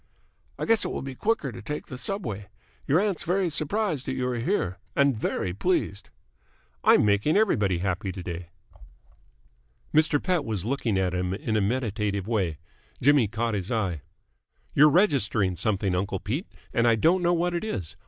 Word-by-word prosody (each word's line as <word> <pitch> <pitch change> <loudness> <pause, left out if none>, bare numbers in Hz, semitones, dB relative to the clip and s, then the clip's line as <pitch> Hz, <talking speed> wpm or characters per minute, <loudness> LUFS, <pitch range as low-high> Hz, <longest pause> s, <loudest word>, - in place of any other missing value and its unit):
"I - - -2
guess 225 -1 +3
it - - -1
will - - -4
be 135 -1 -5
quicker 150 - -1
to - - -9
take 150 +8 -5
the 130 - -8
subway. 120 - -4 0.4
Your 145 +5 +4
aunt's 200 -3 0
very 180 0 0
surprised 155 - -1
that 130 - -1
you 125 -1 -1
are 120 -1 -2
here, 115 - -1 0.2
and 140 -2 +3
very 95 -4 -2
pleased." 100 - -1 0.7
"I'm - - +6
making 105 - +3
everybody 105 - +2
happy 95 +2 -2
to 95 -1 -7
day." 85 -1 -6 1.4
Mr. 150 -1 +4
Pett 180 -3 0
was 105 -7 -3
looking 120 -5 0
at 95 -1 0
him 90 +1 -1
in 110 +2 -2
a 105 - +3
meditative 105 -3 -1
way. 95 -9 0 0.4
Jimmy 140 -3 +4
caught 115 +2 -2
his 100 0 -3
eye. 95 - -1 0.7
"You're 150 +2 +7
registering 125 - +2
something, 100 -1 0
uncle 95 +1 -1
Pete, 140 - -3 0.3
and 115 0 +3
I 115 - +5
don't 170 - +3
know 175 0 +3
what 175 +1 0
it 170 - -2
is. 95 - -4
115 Hz, 175 wpm, -26 LUFS, 100-155 Hz, 1.4 s, You're